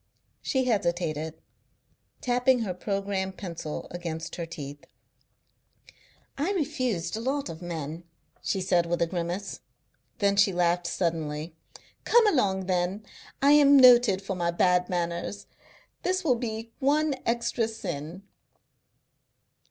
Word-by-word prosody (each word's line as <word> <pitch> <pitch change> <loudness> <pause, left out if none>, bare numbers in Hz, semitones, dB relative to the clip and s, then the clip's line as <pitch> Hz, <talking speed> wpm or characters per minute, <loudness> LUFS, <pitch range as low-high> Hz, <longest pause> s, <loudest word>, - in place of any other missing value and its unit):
She 265 -1 0
hesitated, 170 -8 -1 0.8
tapping 250 0 +2
her 195 -5 -2
programme 195 0 -2
pencil 170 -5 -6
against 165 -2 -5
her 170 -1 -4
teeth. 145 -4 -8 1.5
"I 340 +8 0
refused 255 - -1
a - - -3
lot 275 -1 -1
of 165 0 -8
men," 165 -1 -5 0.4
she 195 - -1
said, 180 -2 +2
with 175 0 -1
a - - +3
grimace. 175 +3 -4 0.6
Then 200 -2 +2
she 200 0 +5
laughed 175 0 +1
suddenly. 160 -3 -2 0.5
"Come 475 -1 +5
along, 200 - +2
then. 185 +3 -1 0.4
I 280 - +6
am 285 -1 +7
noted 240 -7 +7
for 195 0 -3
my 170 -1 0
bad 180 +1 +2
manners. 175 +3 -3 0.6
This 370 +1 0
will 310 - +2
only 225 -2 -1
be 230 0 -26
one 295 +2 +2
extra 235 -1 0
sin." 180 -5 -6
190 Hz, 125 wpm, -27 LUFS, 170-240 Hz, 1.5 s, am